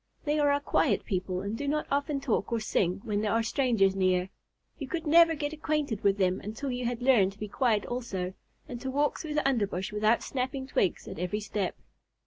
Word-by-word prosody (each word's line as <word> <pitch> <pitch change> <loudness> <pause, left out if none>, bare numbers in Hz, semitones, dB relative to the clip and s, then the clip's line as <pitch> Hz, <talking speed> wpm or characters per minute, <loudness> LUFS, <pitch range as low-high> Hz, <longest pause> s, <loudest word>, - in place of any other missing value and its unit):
They 300 0 +1
are 290 -1 +4
a 285 - +2
quiet 285 - +1
people 185 -2 -2
and 200 +3 -3
do 285 +5 -4
not 300 +1 0
often 285 0 0
talk 265 -4 -1
or 230 - +1
sing 195 -4 0
when 210 -1 -1
there 215 0 0
are 230 0 +2
strangers 225 -6 +2
near. 185 -1 +1 0.5
You 280 - -5
could 330 +2 -3
never 330 +1 +6
get 290 0 -3
acquainted 300 -7 -1
with 200 0 +3
them 185 -2 +1
until 225 +7 -4
you 250 0 -3
had 245 0 -2
learned 215 -8 +4
to 200 - -22
be 210 - -4
quiet 215 -2 +1
also, 195 -7 -3 0.3
and 240 -1 -7
to 265 - -3
walk 290 +2 0
through 310 -4 -5
the 300 -2 +2
underbrush 205 -7 -1
without 215 +2 +2
snapping 265 0 -3
twigs 195 -8 0
at - - -7
every 180 +4 -1
step. 205 -2 -2
235 Hz, 215 wpm, -29 LUFS, 200-285 Hz, 0.5 s, never